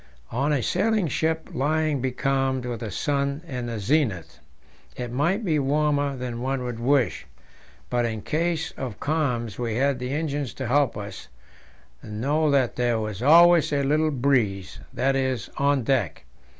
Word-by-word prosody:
On 140 +5 0
a 140 -5 +1
sailing 210 0 +1
ship, 160 +3 -1
lying 150 +1 0
becalmed 130 0 0
with 120 -2 -4
the 110 - -5
sun 140 - -1
in 125 -4 -4
the 115 -1 -4
zenith, 105 - 0 0.6
it 125 -1 -4
might 170 - 0
be 155 -4 +2
warmer 145 0 +1
than 125 -2 -5
one 135 0 -1
would 120 -2 -4
wish; 130 +1 +1 0.6
but 120 -1 0
in 110 -3 -3
case 165 0 -1
of 125 -6 -6
calms 125 -8 -1
we 115 -3 -2
had 135 +1 +1
the 125 0 -4
engine 145 -1 -1
to 130 +1 -6
help 135 0 +2
us, 100 0 -7 0.7
so 140 +9 0
that 135 -4 +2
there 120 -2 +1
was 110 -1 -4
always 170 +4 +6
a 140 -1 +1
little 155 +3 +2
breeze 120 - 0
that 135 +2 +1
is, 130 -4 -1
on 140 -2 +2
deck. 115 - 0
135 Hz, 160 wpm, -25 LUFS, 120-150 Hz, 0.7 s, always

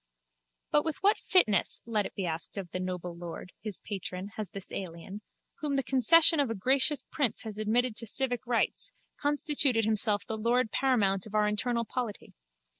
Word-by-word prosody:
But 295 - +3
with 320 +1 -3
what 410 +2 +4
fitness, 215 - +2
let 215 -3 0
it - - -18
be 195 - -3
asked 165 +4 -3
of 185 -4 -6
the 185 - -3
noble 180 -1 -4
lord, 175 +1 -8
his 210 -3 -5
patron, 190 -1 -5
has 215 -2 -6
this 195 0 -9
alien, 190 +3 -7 0.4
whom 290 -2 -1
the 270 - +1
concession 305 +6 +6
of 280 -4 +2
a 225 - -2
gracious 265 +7 +2
prince 275 -8 0
has 215 -2 -7
admitted 225 +2 +1
to 230 - -4
civic 245 0 0
rights, 245 - 0 0.3
constituted 285 -5 +2
himself 215 -1 +1
the 220 -1 -4
lord 235 +1 +1
paramount 210 -8 +1
of 215 - -8
our 210 0 +3
internal 235 +3 -1
polity? 235 -3 -5
220 Hz, 180 wpm, -29 LUFS, 200-260 Hz, 0.4 s, concession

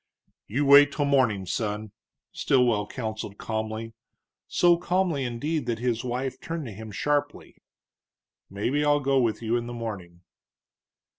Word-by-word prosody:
"You 140 +7 0
wait 140 +1 +8
till 145 0 -1
morning, 125 -9 +2
son," 105 +2 -3 0.4
Stilwell 120 -6 +2
counseled 110 -4 -5
calmly, 110 0 -4 0.5
so 175 -1 +4
calmly, 175 -4 0
indeed, 130 +4 -2
that 115 -2 -1
his 120 0 -1
wife 125 +1 -3
turned 165 -2 -4
to 115 - -6
him 110 +2 -9
sharply. 145 +6 -2 0.9
"Maybe 120 +9 -1
I'll 145 0 +3
go 135 -1 +2
with 115 -2 0
you 115 +1 0
in 120 0 -4
the 120 - -6
morning." 95 -7 -7
120 Hz, 140 wpm, -26 LUFS, 110-145 Hz, 0.9 s, wait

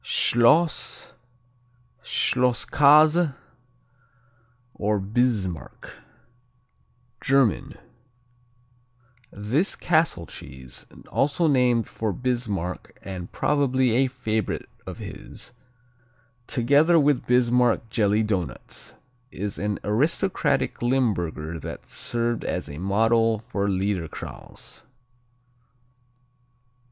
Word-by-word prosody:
Schloss, 145 +8 +2 0.9
Schlosskäse, 145 +5 +4 1.4
or 105 0 0
Bismarck 100 -4 -2 1.2
German 135 +1 +2 1.6
This 120 - 0
Castle 160 - +1
cheese, 65 -5 -8 0.2
also 145 +5 +1
named 125 -6 +3
for 110 -2 -3
Bismarck 105 -6 -3
and 90 -2 -7
probably 130 -4 +1
a 130 +4 +3
favorite 110 -5 -3 0.2
of - - -6
his, - - -9 1.0
together 145 +7 +4
with 145 -2 +2
Bismarck 125 -1 +3
jelly 105 -1 +2
doughnuts, 90 - -4 0.3
is 100 -2 -5
an 105 0 -1
aristocratic 140 - 0
Limburger 90 -11 -1
that - - -8
served 120 -1 -1
as - - -3
a 70 +1 -8
model 115 +4 +2
for 105 -2 -3
Liederkranz. 95 -4 -4
120 Hz, 75 wpm, -24 LUFS, 100-135 Hz, 1.6 s, Schlosskäse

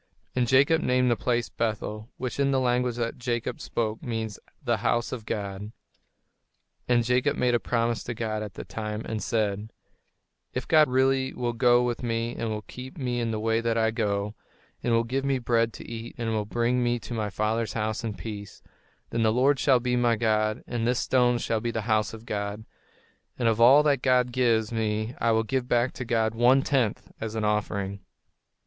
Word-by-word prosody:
And 125 -1 +2
Jacob 140 +6 +4
named 125 -2 +2
that 120 - +2
place 120 -1 0
Bethel, 110 -1 -3
which 125 +1 -4
in 140 0 +3
the 135 -1 +2
language 125 -1 +1
that 120 0 -3
Jacob 120 -1 -2
spoke 110 -1 -2
means 110 -3 -4 0.2
"The - - +1
House 120 0 0
of 115 -4 -6
God." 100 0 -4 1.2
And 120 -1 +3
Jacob 125 +5 +1
made 125 -1 +2
a 120 - +3
promise 115 -1 0
to 120 - -4
God 110 -1 -2
at 105 -3 -7
that - - -8
time, 105 0 -4
and 110 -1 -3
said: 105 -2 -1 0.8
"If - - -3
God 155 -2 +6
really 130 +1 +2
will 120 -1 -1
go 120 0 +4
with 120 -1 -2
me 115 0 -2
and 115 - -3
will 105 -1 -3
keep 130 +4 -10
me 125 -3 -2
in 115 -1 -1
the 110 -1 -2
way 115 +1 +1
that 115 0 0
I 110 0 +2
go, 105 -2 -1 0.5
and 120 - 0
will 115 0 +3
give 130 +4 -2
me 135 -1 +1
bread 115 -2 +1
to - - -10
eat 115 0 -7
and 115 -2 -2
will 110 -1 -1
bring 120 +3 0
me 120 0 +1
to 120 - -8
my 110 -2 -1
father's 110 +2 -1
house 110 0 -2
in 110 -3 -3
peace, 100 +2 -8 0.5
then 115 - 0
the 110 -1 +4
Lord 135 +4 +3
shall 130 -3 +4
be 125 0 0
my 120 -1 +3
God: 110 -1 +1
and 120 -1 -2
this 125 0 +2
stone 125 -1 +3
shall 115 -2 -1
be 120 - -1
the 115 -1 -2
house 110 -1 +1
of 110 0 -10
God, 105 0 -4 0.7
and 120 - +1
of 115 0 +2
all 135 +5 +8
that 140 -4 +2
God 125 -1 +3
gives 115 -3 +2
me 110 0 -1
I 115 - +3
will 110 0 +3
give 130 +2 -2
back 120 +1 +2
to 125 - -6
God 110 -1 +1
one 125 +4 +4
tenth 125 -7 0
as 110 0 -4
an 110 -1 -1
offering." 100 -2 -1
115 Hz, 205 wpm, -27 LUFS, 110-125 Hz, 1.2 s, all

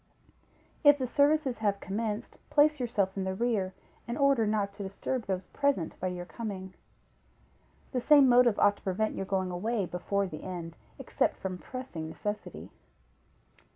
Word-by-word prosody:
If 290 -1 +8
the 260 - -1
services 285 -1 +2
have 205 -2 0
commenced, 215 +3 -4
place 300 0 +4
yourself 215 -6 0
in 195 - -2
the 190 0 -2
rear, 200 -4 0 0.3
in 235 - -3
order 275 -6 +3
not 205 -2 0
to 205 - -9
disturb 200 +5 -3
those 190 -1 -2
present 280 - 0
by 185 - -1
your 180 -1 -4
coming. 190 -3 -6 1.2
The 250 - -1
same 285 0 +7
motive 245 -3 +5
ought 205 0 +4
to - - -20
prevent 205 +3 0
your 195 - -4
going 190 -2 0
away 205 +3 -1
before 195 +3 -1
the 155 -5 -7
end, 170 -3 -6 0.2
except - - 0
from 185 -1 -5
pressing 215 -12 -6
necessity. 205 +7 -5
205 Hz, 155 wpm, -30 LUFS, 190-245 Hz, 1.2 s, If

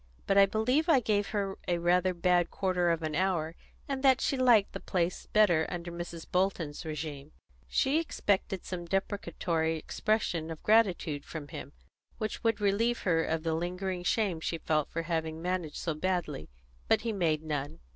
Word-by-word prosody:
But 195 - +2
I 195 0 +7
believe 250 - +1
I 295 -5 +6
gave 205 -3 +1
her 200 -2 -2
rather 175 +1 +2
a - - -1
bad 175 0 +2
quarter 185 -2 0
of 165 -1 0
an 155 -1 -2
hour, 165 -2 0 0.3
and 270 -1 -2
that 265 -1 +5
she - - 0
liked 245 -6 +4
the - - -4
place 180 -1 -2
better 180 -7 +4
under 175 -1 -5
Mrs. 170 -1 -6
Bolton's 180 -5 -1
régime." 150 -3 -5 0.4
She 280 +4 +2
expected 200 - -1
some 175 -2 -5
deprecatory 170 -4 -1
expression 170 -2 -1
of 160 -1 -7
gratitude 185 -9 +2
from 150 -3 -8
him, 140 +2 -8 0.4
which 215 0 -4
would 225 -2 +2
relieve 215 +4 +1
her 165 -3 +2
of 160 0 -1
the 165 -1 0
lingering 180 +2 -2
shame 190 -3 +1
she 165 +1 -2
felt 155 -2 0
for 165 - -3
having 160 -1 -2
managed 175 -2 -2
so 165 - -2
badly, 175 - -2 0.4
but - - +3
he 230 -1 -2
made 160 -6 +1
none. 150 0 -3
180 Hz, 175 wpm, -30 LUFS, 160-205 Hz, 0.4 s, I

